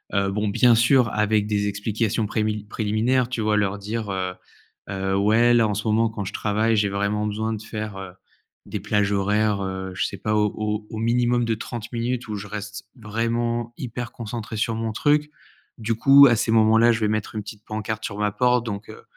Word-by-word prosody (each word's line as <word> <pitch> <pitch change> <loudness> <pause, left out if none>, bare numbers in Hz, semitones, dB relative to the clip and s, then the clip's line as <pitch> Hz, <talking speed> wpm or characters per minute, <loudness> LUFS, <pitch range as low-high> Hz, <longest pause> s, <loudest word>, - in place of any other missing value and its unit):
Heu, 100 -1 +1
bon 105 +2 -1
bien 120 +4 +4
sûr 120 +1 +4
avec 105 0 +2
des 105 -1 0
explications 105 +2 -1
prémi 105 0 -1
préliminaires 115 +4 0
tu 125 -3 -3
vois? 110 0 +1
Leur 100 -1 0
dire, 105 +1 -4
heu, 95 -1 -2 0.6
heu: 95 -1 -2
«Ouais 110 +4 +4
là 115 -2 +4
en 105 - -2
ce 110 +3 -3
moment 110 +1 +2
quand 105 -2 -5
je 100 - -6
travaille, 110 +2 +1
j'ai 105 -1 +2
vraiment 100 +2 -1
besoin 110 +2 -2
de 105 - -5
faire, 110 -2 -6
heu, 95 -2 -8 0.5
des - - -5
plages 105 -1 0
horaires, 105 +1 +1
heu, 95 0 -4
je 90 - -1
sais - - -7
pas 105 - -2
au 105 0 -1
au 110 - -6
minimum 120 +1 +1
de 115 - 0
30 115 0 -6
minutes 120 +1 -2
où - - -3
je 100 0 -6
reste 105 -1 -7
vraiment 115 +1 -2
hyper 120 -2 -5
concentré 115 -1 -6
sur 115 +2 0
mon 110 0 -2
truc. 150 +6 +1 0.5
Du 115 0 -1
coup 135 +5 +7
à 120 - +4
ces 110 - -1
moments 110 0 +5
là 120 +1 +6
je 115 - 0
vais 105 - +2
mettre 110 0 -2
une 105 - -3
petite 105 0 -10
pancarte 110 0 -4
sur 100 - -5
ma 105 0 0
porte 125 +1 +2
donc 105 -2 -5
heu, - - -11
110 Hz, 215 wpm, -23 LUFS, 105-115 Hz, 0.6 s, coup